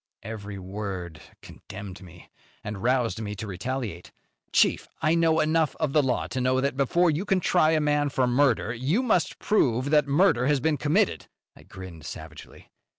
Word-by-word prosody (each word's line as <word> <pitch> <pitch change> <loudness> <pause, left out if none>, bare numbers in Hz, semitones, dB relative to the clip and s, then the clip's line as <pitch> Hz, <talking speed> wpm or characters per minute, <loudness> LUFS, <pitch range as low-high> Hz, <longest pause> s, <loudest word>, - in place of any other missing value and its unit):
Every 105 -2 -7
word 95 -4 -6 0.2
condemned 100 0 -10
me, 90 -1 -15 0.3
and 105 -2 -6
roused 120 -1 +1
me 105 -1 -4
to 110 - -6
retaliate. 105 -1 -5 0.4
"Chief, - - +2
I 155 0 +2
know 165 -1 +3
enough 155 0 +1
of 155 -4 -2
the 150 - +5
law 130 -3 0
to 130 - -3
know 130 +1 +2
that, 140 0 -1
before 165 +6 +2
you 155 +5 -2
can 195 -2 +1
try 160 -2 +3
a 155 - +3
man 145 -1 +1
for 130 -1 +1
murder, 125 -3 +2
you 140 - 0
must 200 -9 +1
prove 135 - +1
that 150 -1 +4
murder 140 -4 +3
has 145 -1 +2
been 150 +3 +1
committed." 165 +9 +1 0.3
I - - -16
grinned 90 -4 -11
savagely. 80 -1 -11
130 Hz, 175 wpm, -26 LUFS, 105-155 Hz, 0.4 s, the